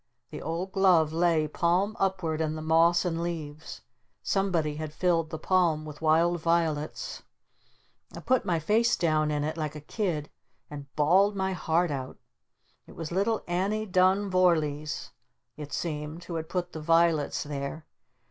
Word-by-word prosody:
The -, -, -7 dB
old 170 Hz, +4 st, -3 dB
glove 175 Hz, -6 st, +4 dB
lay 165 Hz, -2 st, +2 dB
palm 180 Hz, +7 st, +1 dB
upward 185 Hz, -5 st, 0 dB
in 155 Hz, -1 st, -1 dB
the 155 Hz, -, -5 dB
moss 165 Hz, +3 st, +4 dB
and 165 Hz, -1 st, -1 dB
leaves. 160 Hz, -3 st, -6 dB, 0.4 s
Somebody 170 Hz, -7 st, 0 dB
had 155 Hz, -1 st, -5 dB
filled 170 Hz, -3 st, +1 dB
the 160 Hz, -, -5 dB
palm 165 Hz, -2 st, +1 dB
with 150 Hz, 0 st, -10 dB
wild 165 Hz, +2 st, +3 dB
violets. 160 Hz, -3 st, -1 dB, 0.9 s
I -, -, -7 dB
put 255 Hz, -1 st, +2 dB
my 175 Hz, -4 st, 0 dB
face 220 Hz, +9 st, +2 dB
down 155 Hz, -2 st, +1 dB
in 150 Hz, -1 st, -1 dB
it 155 Hz, +2 st, -3 dB
like 155 Hz, -1 st, -3 dB
a -, -, -6 dB
kid 155 Hz, -2 st, -3 dB, 0.4 s
and 140 Hz, -2 st, -9 dB
bawled 190 Hz, +7 st, +4 dB
my 190 Hz, 0 st, -1 dB
heart 170 Hz, 0 st, 0 dB
out. 130 Hz, -2 st, -5 dB, 0.7 s
It -, -, -14 dB
was 165 Hz, -1 st, -6 dB
little 200 Hz, +5 st, 0 dB
Annie 195 Hz, +5 st, -1 dB
Dun 190 Hz, +1 st, +2 dB
Vorlees 155 Hz, -5 st, +1 dB, 0.4 s
it 145 Hz, -1 st, -8 dB
seemed 155 Hz, +1 st, -4 dB
who 175 Hz, -, -7 dB
had 160 Hz, -1 st, -4 dB
put 180 Hz, -1 st, -3 dB
the 160 Hz, -, -6 dB
violets 165 Hz, -1 st, +2 dB
there. 145 Hz, +2 st, -5 dB
165 Hz, 155 wpm, -28 LUFS, 155-185 Hz, 0.9 s, glove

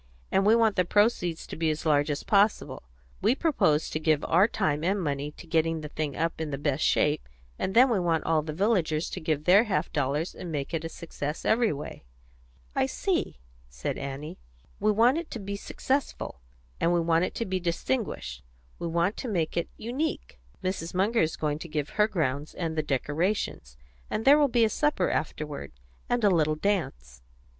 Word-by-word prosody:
And 195 Hz, +1 st, +3 dB
we 220 Hz, -, +6 dB
want 225 Hz, -3 st, +3 dB
the 180 Hz, -, +4 dB
proceeds 180 Hz, -4 st, +1 dB
to -, -, -7 dB
be 160 Hz, 0 st, 0 dB
as 155 Hz, +1 st, -3 dB
large 145 Hz, -1 st, +3 dB
as 145 Hz, -, -2 dB
possible. 205 Hz, +1 st, +2 dB, 0.4 s
We 220 Hz, +6 st, +3 dB
propose 210 Hz, -, +2 dB
to 155 Hz, -, -1 dB
give 155 Hz, -1 st, +1 dB
our 180 Hz, +6 st, +5 dB
time 155 Hz, -10 st, -1 dB
and 195 Hz, +4 st, +1 dB
money 145 Hz, -4 st, -2 dB
to -, -, -12 dB
getting 165 Hz, -1 st, +1 dB
the 150 Hz, -, -6 dB
thing 150 Hz, -2 st, -3 dB
up 165 Hz, 0 st, -1 dB
in 160 Hz, -, -2 dB
the 140 Hz, -, -3 dB
best 145 Hz, 0 st, -1 dB
shape, 150 Hz, -, +2 dB, 0.3 s
and 190 Hz, -, -2 dB
then 250 Hz, +3 st, +8 dB
we 230 Hz, -6 st, +1 dB
want 170 Hz, -2 st, +1 dB
all 160 Hz, -1 st, +2 dB
the 155 Hz, +1 st, -5 dB
villagers 170 Hz, -3 st, +1 dB
to -, -, -4 dB
give 155 Hz, -3 st, -1 dB
their 195 Hz, +7 st, +6 dB
half 205 Hz, -4 st, -1 dB
dollars 145 Hz, +4 st, -1 dB
and 175 Hz, -2 st, -7 dB
make 145 Hz, +1 st, -3 dB
it 165 Hz, -1 st, -1 dB
a 165 Hz, -, -4 dB
success 155 Hz, -2 st, -6 dB
every 230 Hz, 0 st, +3 dB
way." 145 Hz, -, -7 dB, 0.7 s
"I -, -, +2 dB
see," -, -, -1 dB, 0.3 s
said -, -, -4 dB
Annie. 140 Hz, +2 st, -6 dB, 0.4 s
"We 215 Hz, +1 st, +3 dB
want 240 Hz, +8 st, +4 dB
it 340 Hz, -, -7 dB
to 235 Hz, -, -4 dB
be 200 Hz, 0 st, -4 dB
successful, 260 Hz, -, -3 dB, 0.4 s
and 170 Hz, -, +2 dB
we 175 Hz, -, +3 dB
want 165 Hz, +1 st, +2 dB
it -, -, -6 dB
to 230 Hz, -, -2 dB
be 185 Hz, -2 st, -1 dB
distinguished; 170 Hz, -, -2 dB, 0.4 s
we 170 Hz, -, -3 dB
want 170 Hz, +4 st, 0 dB
to 260 Hz, -, -4 dB
make 170 Hz, -8 st, -1 dB
it 170 Hz, -, -1 dB
unique. 240 Hz, -, -3 dB, 0.2 s
Mrs. 185 Hz, -2 st, -3 dB
Munger 210 Hz, +5 st, +2 dB
is 160 Hz, 0 st, 0 dB
going 150 Hz, -1 st, -2 dB
to 170 Hz, -, -8 dB
give 150 Hz, -2 st, -2 dB
her 210 Hz, 0 st, +3 dB
grounds 150 Hz, -7 st, -2 dB
and 165 Hz, -2 st, -3 dB
the 155 Hz, -, +1 dB
decorations, 150 Hz, -, -2 dB, 0.3 s
and 220 Hz, -, -2 dB
there 285 Hz, +2 st, +7 dB
will 290 Hz, -, +5 dB
be 240 Hz, -3 st, +3 dB
a -, -, +1 dB
supper 295 Hz, -6 st, +1 dB
afterward, 150 Hz, -, -4 dB, 0.4 s
and 245 Hz, -1 st, +1 dB
a 205 Hz, -, +5 dB
little 155 Hz, -3 st, +2 dB
dance." 65 Hz, -, -2 dB
165 Hz, 200 wpm, -27 LUFS, 150-205 Hz, 0.7 s, then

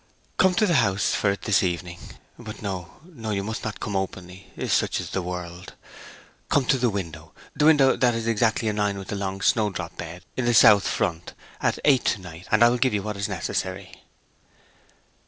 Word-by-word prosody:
Come 190 Hz, -1 st, +4 dB
to 220 Hz, -, +3 dB
the 180 Hz, -, +1 dB
house 100 Hz, -2 st, +1 dB
for 100 Hz, -, +1 dB
it 100 Hz, -, -3 dB
this 105 Hz, -, +3 dB
evening. 85 Hz, -1 st, -3 dB, 0.4 s
But 110 Hz, -2 st, -9 dB
no, 95 Hz, -4 st, -5 dB
no 145 Hz, -11 st, -9 dB
you 100 Hz, -2 st, -1 dB
must 110 Hz, +2 st, -5 dB
not 110 Hz, -, -5 dB
come 105 Hz, -, -4 dB
openly; 95 Hz, -1 st, -5 dB, 0.2 s
such -, -, +1 dB
is -, -, -6 dB
the 95 Hz, -, -1 dB
world. 90 Hz, 0 st, -7 dB, 0.7 s
Come 140 Hz, -3 st, +2 dB
to 130 Hz, -, +2 dB
the 120 Hz, 0 st, +2 dB
window 85 Hz, -6 st, -6 dB, 0.2 s
the 150 Hz, -, +2 dB
window 140 Hz, -4 st, +5 dB
that 120 Hz, -2 st, +2 dB
is 115 Hz, -1 st, -3 dB
exactly 115 Hz, 0 st, +1 dB
in 105 Hz, -1 st, -1 dB
a -, -, +2 dB
line 100 Hz, -1 st, 0 dB
with 95 Hz, -1 st, -8 dB
the -, -, -3 dB
long 95 Hz, -1 st, -4 dB
snowdrop 95 Hz, -7 st, 0 dB
bed, 85 Hz, +1 st, -8 dB
in 130 Hz, -, -2 dB
the 120 Hz, -1 st, +2 dB
south 105 Hz, -3 st, +7 dB
front 85 Hz, -4 st, -2 dB, 0.3 s
at -, -, +1 dB
eight 135 Hz, -4 st, +4 dB
to -, -, +1 dB
night, 90 Hz, 0 st, -11 dB
and 110 Hz, +1 st, +4 dB
I 120 Hz, -, +7 dB
will 125 Hz, 0 st, 0 dB
give 125 Hz, -3 st, +2 dB
you 100 Hz, -, -1 dB
what 105 Hz, 0 st, -4 dB
is 100 Hz, 0 st, -3 dB
necessary.' 95 Hz, +1 st, -4 dB
100 Hz, 210 wpm, -24 LUFS, 95-115 Hz, 0.7 s, south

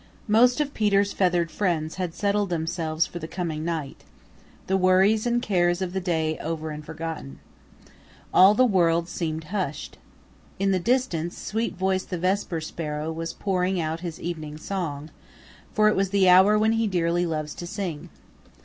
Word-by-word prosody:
Most 245 Hz, +5 st, +4 dB
of 290 Hz, -1 st, -1 dB
Peter's 200 Hz, -2 st, +2 dB
feathered 175 Hz, -3 st, +1 dB
friends 165 Hz, -5 st, -1 dB
had 180 Hz, -3 st, -3 dB
settled 205 Hz, -1 st, 0 dB
themselves 165 Hz, -1 st, -1 dB
for 175 Hz, -, -7 dB
the 160 Hz, -, -6 dB
coming 165 Hz, -3 st, -4 dB
night, 160 Hz, -4 st, -4 dB, 0.6 s
the 190 Hz, -, 0 dB
worries 190 Hz, +4 st, +3 dB
and 240 Hz, 0 st, +1 dB
cares 175 Hz, -3 st, +2 dB
of 185 Hz, -2 st, -3 dB
the 190 Hz, -, 0 dB
day 160 Hz, -3 st, -1 dB
over 160 Hz, -1 st, -4 dB
and 150 Hz, 0 st, -7 dB
forgotten. 160 Hz, -, -6 dB, 1.0 s
All 190 Hz, +3 st, +7 dB
the 255 Hz, -, +5 dB
Great 230 Hz, -, 0 dB
World 170 Hz, -2 st, +3 dB
seemed 160 Hz, -2 st, -3 dB
hushed. 180 Hz, -8 st, -3 dB, 0.6 s
In 195 Hz, 0 st, +1 dB
the 185 Hz, -, +2 dB
distance 180 Hz, -6 st, 0 dB
Sweetvoice 190 Hz, -4 st, -1 dB
the 180 Hz, -, -4 dB
Vesper 185 Hz, -1 st, -1 dB
Sparrow 155 Hz, -1 st, -4 dB
was 165 Hz, +1 st, -4 dB
pouring 185 Hz, -1 st, -1 dB
out 160 Hz, 0 st, -2 dB
his 170 Hz, -2 st, -6 dB
evening 155 Hz, -3 st, -5 dB
song, 155 Hz, -4 st, -4 dB, 0.6 s
for 215 Hz, 0 st, +3 dB
it 215 Hz, -, +3 dB
was 195 Hz, 0 st, +1 dB
the 195 Hz, -1 st, +3 dB
hour 190 Hz, +4 st, +7 dB
when 220 Hz, +1 st, +3 dB
he 225 Hz, 0 st, +1 dB
dearly 175 Hz, -2 st, +1 dB
loves 155 Hz, -2 st, -3 dB
to 175 Hz, -, -7 dB
sing. 180 Hz, -6 st, -5 dB
175 Hz, 165 wpm, -25 LUFS, 160-195 Hz, 1.0 s, All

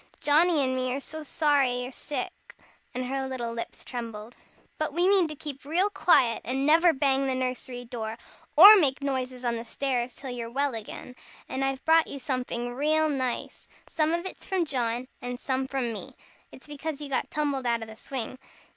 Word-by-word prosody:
Johnnie 310 Hz, +1 st, +4 dB
and 260 Hz, 0 st, 0 dB
me 255 Hz, 0 st, -1 dB
are -, -, -2 dB
so 315 Hz, +3 st, -6 dB
sorry 280 Hz, -5 st, +1 dB
you're 250 Hz, -, -6 dB
sick," 290 Hz, +3 st, -6 dB, 0.4 s
and 255 Hz, 0 st, -2 dB
her 265 Hz, +1 st, -2 dB
little 240 Hz, -3 st, -4 dB
lips 230 Hz, -, -7 dB
trembled. 230 Hz, -2 st, -6 dB, 0.4 s
"But 310 Hz, -2 st, -1 dB
we 350 Hz, +3 st, +2 dB
mean 385 Hz, -3 st, +4 dB
to 305 Hz, -, -7 dB
keep 280 Hz, -2 st, -7 dB
real 355 Hz, +8 st, +1 dB
quiet, 250 Hz, -, +4 dB
and 265 Hz, +3 st, -1 dB
never 330 Hz, +3 st, +6 dB
bang 275 Hz, -2 st, +1 dB
the 260 Hz, -, 0 dB
nursery 255 Hz, -1 st, -3 dB
door, 225 Hz, -2 st, -5 dB, 0.4 s
or 400 Hz, +8 st, +12 dB
make 280 Hz, -5 st, +2 dB
noises 255 Hz, -2 st, -3 dB
on 235 Hz, -1 st, 0 dB
the 230 Hz, -, -5 dB
stairs, 245 Hz, 0 st, -2 dB
till 265 Hz, -2 st, -7 dB
you're 235 Hz, -2 st, -5 dB
well 275 Hz, +2 st, 0 dB
again. 225 Hz, +3 st, -8 dB, 0.3 s
And 265 Hz, -, -2 dB
I've 270 Hz, 0 st, -2 dB
brought 325 Hz, 0 st, +5 dB
you -, -, -6 dB
somefing 250 Hz, -2 st, -3 dB
real 310 Hz, +3 st, +2 dB
nice. 260 Hz, -4 st, -3 dB, 0.2 s
Some 310 Hz, 0 st, +1 dB
of 340 Hz, +2 st, -1 dB
it's 375 Hz, -, -8 dB
from 375 Hz, -3 st, +1 dB
John, 245 Hz, -4 st, -1 dB, 0.2 s
and 245 Hz, 0 st, -5 dB
some 265 Hz, -1 st, -1 dB
from 260 Hz, -4 st, -2 dB
me. 215 Hz, -, -8 dB, 0.4 s
It's 260 Hz, -, -14 dB
because 295 Hz, 0 st, -5 dB
you 295 Hz, -, -6 dB
got 275 Hz, -, -1 dB
tumbled 285 Hz, -4 st, -1 dB
out 235 Hz, -1 st, +1 dB
of -, -, -8 dB
the 220 Hz, -, -10 dB
swing. 255 Hz, +1 st, -5 dB
265 Hz, 195 wpm, -27 LUFS, 245-300 Hz, 0.4 s, or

